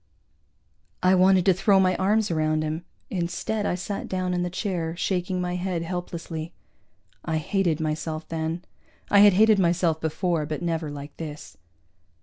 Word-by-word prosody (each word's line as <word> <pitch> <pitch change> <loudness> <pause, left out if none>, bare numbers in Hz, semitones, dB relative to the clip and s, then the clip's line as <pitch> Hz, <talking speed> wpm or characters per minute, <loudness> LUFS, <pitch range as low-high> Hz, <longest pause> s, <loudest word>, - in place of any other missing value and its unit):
I 185 +1 +5
wanted 185 0 +5
to 190 - +6
throw 195 +2 +3
my 185 -1 +3
arms 210 +1 +2
around 155 -1 +1
him; 155 +3 -3 0.3
instead 190 +4 -2
I - - 0
sat 195 +2 -4
down 185 -1 -1
in 175 - 0
the 175 - -1
chair, 175 -3 -3
shaking 185 0 -1
my 180 0 -2
head 180 -2 -2
helplessly. 170 -2 -5 0.7
I 160 - -1
hated 170 0 0
myself 155 0 -3
then. 165 +2 -3 0.5
I 200 - +7
had 205 -1 +8
hated 215 +1 +5
myself 170 -2 +2
before, 160 -1 -1
but 155 +2 -4
never 165 -2 -1
like 145 0 -8
this. 150 -2 -8
175 Hz, 155 wpm, -25 LUFS, 160-185 Hz, 0.7 s, had